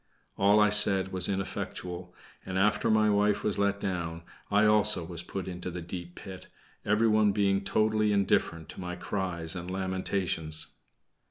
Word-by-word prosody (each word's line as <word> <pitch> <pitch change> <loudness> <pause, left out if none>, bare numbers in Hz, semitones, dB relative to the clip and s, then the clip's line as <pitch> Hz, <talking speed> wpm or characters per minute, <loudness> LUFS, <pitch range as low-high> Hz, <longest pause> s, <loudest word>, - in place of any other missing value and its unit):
All 100 +2 +4
I 105 0 +5
said 100 -2 +4
was 95 -1 0
ineffectual, 90 -2 -5 0.3
and 95 0 -4
after 105 +2 +2
my 110 -1 +4
wife 105 0 +2
was 105 -2 -1
let 100 0 +1
down, 85 -4 -4 0.3
I 105 +1 +3
also 105 -3 +3
was 85 0 -5
put 95 +2 -6
into 90 0 -5
the 90 0 -6
deep 90 0 -8
pit, 95 -3 -10 0.4
everyone 105 -1 +3
being 100 -1 +1
totally 110 0 +1
indifferent 95 -5 +1
to - - -8
my 90 0 -5
cries 90 -3 -3
and 90 0 -6
lamentations. 95 -4 -1
95 Hz, 155 wpm, -29 LUFS, 90-105 Hz, 0.4 s, I